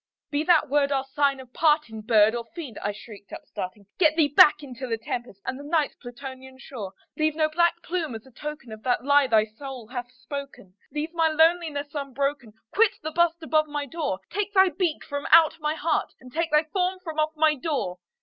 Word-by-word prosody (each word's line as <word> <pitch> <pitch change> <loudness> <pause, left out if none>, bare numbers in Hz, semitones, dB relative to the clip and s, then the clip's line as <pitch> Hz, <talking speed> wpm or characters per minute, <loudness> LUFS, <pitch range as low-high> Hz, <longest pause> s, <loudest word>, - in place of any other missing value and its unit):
"Be 290 +1 0
that 325 -3 +4
word 285 0 +2
our 270 -1 +1
sign 275 0 +1
of 255 -2 -13
parting, 295 -8 +2
bird 215 -1 +4
or 235 -1 -3
fiend!" 290 - -7
I 205 - -1
shrieked, 205 0 -13
upstarting, 190 +3 -7
"Get 315 -4 +5
thee 310 -3 +3
back 295 +1 +6
into 260 -1 -7
the 225 -2 -1
tempest 230 -2 -5
and 260 - -3
the - - -8
Night's 305 0 0
Plutonian 260 +1 -10
shore! 220 -8 -8 0.2
Leave 310 0 +1
no 310 -1 +2
black 340 +2 +1
plume 335 -8 -3
as 225 - -9
a 265 - -17
token 295 -2 -7
of 220 0 -9
that 245 0 0
lie 285 -1 +5
thy 220 -3 +4
soul 250 +2 -9
hath 245 -1 -6
spoken! 265 -6 -8 0.2
Leave 305 +2 -3
my 330 -1 +3
loneliness 320 -2 +2
unbroken! 275 -4 -3 0.2
quit 445 0 +4
the 315 - -3
bust 340 0 +1
above 310 0 +2
my 295 -1 -3
door! 285 - -3
Take 410 0 -2
thy 380 0 +6
beak 355 -4 -1
from 285 0 -4
out 320 0 +6
my 305 0 -1
heart, 320 0 -1
and 255 -1 -14
take 330 +1 0
thy 300 0 +4
form 365 +4 -1
from 320 -3 -5
off 310 +1 +1
my 310 0 +4
door!" 270 - -3
290 Hz, 205 wpm, -25 LUFS, 250-315 Hz, 0.2 s, back